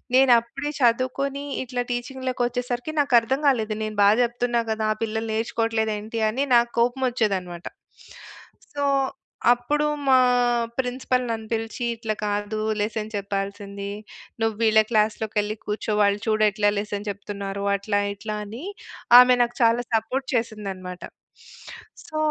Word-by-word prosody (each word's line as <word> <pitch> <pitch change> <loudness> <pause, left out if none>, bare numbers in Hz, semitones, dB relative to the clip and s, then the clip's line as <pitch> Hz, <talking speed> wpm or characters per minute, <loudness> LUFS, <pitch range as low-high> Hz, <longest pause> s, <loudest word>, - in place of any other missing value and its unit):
నేనప్పుడే 260 +2 +3
చదువుకుని, 260 +4 +1 0.2
ఇట్లా 250 -1 -3
టీచింగ్‌లో‌కొచ్చేసరికి, 245 +1 -3
నాకర్థంగాలేదు, 250 -3 +2
నేను 215 -1 -5
బా 200 - +7
జెప్తున్నా 240 0 0
కదా, 220 0 -1
ఆ - - -23
పిల్లలు 220 0 -3
నేర్చుకోవట్లేదేంటి 220 -1 -1
అని, 265 +5 -1
నాకు 235 0 +4
కోపం 245 +3 +1
వొచ్చేదన్నమాట. 190 -7 -2 1.1
సో, 285 - 0 0.7
అప్పుడు 290 +5 0 0.2
మా 260 -1 +7 0.6
ప్రిన్సిపల్ 255 0 0
నన్ను 220 -1 -3
పిలిచీ, 225 +1 -3
"ఇట్లా 225 -1 -3
కాదు 205 +1 -2 0.2
లెసన్ 215 +1 -2
చెప్పాల్సిందీ. 200 0 -4 0.5
నువ్వీళ్ళ 220 0 +3
క్లాస్‌లోకెళ్లి 215 -1 0
కూర్చో, 210 +1 -3
వాళ్ళు 200 0 +3
చూడు 215 -1 +2
ఎట్లా 205 0 +1
లెసన్ 205 0 -4
చెప్తున్నారో." 200 0 -5
అట్లా, 205 +1 -1 0.2
ఇట్లా, 210 +1 -5
అని 220 +6 -8 0.6
ఆమె 250 0 +8
నాకు 240 0 -1
చాలా 230 +1 +4
సపోర్ట్ 255 +5 -1
చేసిందనమాట. 195 -6 -4 1.0
సో, 310 - -8
225 Hz, 115 wpm, -24 LUFS, 210-245 Hz, 1.1 s, ఆమె